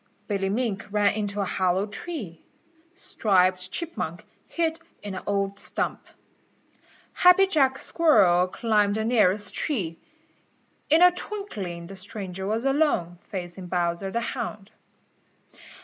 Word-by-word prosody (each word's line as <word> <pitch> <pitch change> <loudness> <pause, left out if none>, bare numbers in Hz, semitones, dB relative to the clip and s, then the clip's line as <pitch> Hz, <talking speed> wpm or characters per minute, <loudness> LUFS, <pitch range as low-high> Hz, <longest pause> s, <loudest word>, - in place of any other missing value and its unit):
Billy 195 -2 -1
Mink 210 -2 -2
ran 205 0 +2
into 205 -1 -2
a - - 0
hollow 185 +1 +1
tree. 210 - -7 0.5
Striped 185 - +1
Chipmunk 335 - -4 0.2
hid 325 -1 -1 0.2
in 205 -2 -5
an 190 - -5
old 200 0 -1
stump. - - -1 1.1
Happy 360 +2 +6
Jack 275 -8 +2
Squirrel 195 - +4
climbed 210 0 +1
the 220 0 -1
nearest 205 -4 +2
tree. 185 - -2 0.9
In 320 +4 +6
a 360 - +8
twinkling 230 - -6
the 195 +3 -9
stranger 190 -1 -5
was 225 +4 -1
alone, 270 - +1
facing 180 -1 -6
Bowser 175 +1 -1
the 235 +4 -2
Hound. 215 -3 -5
205 Hz, 120 wpm, -25 LUFS, 185-270 Hz, 1.1 s, a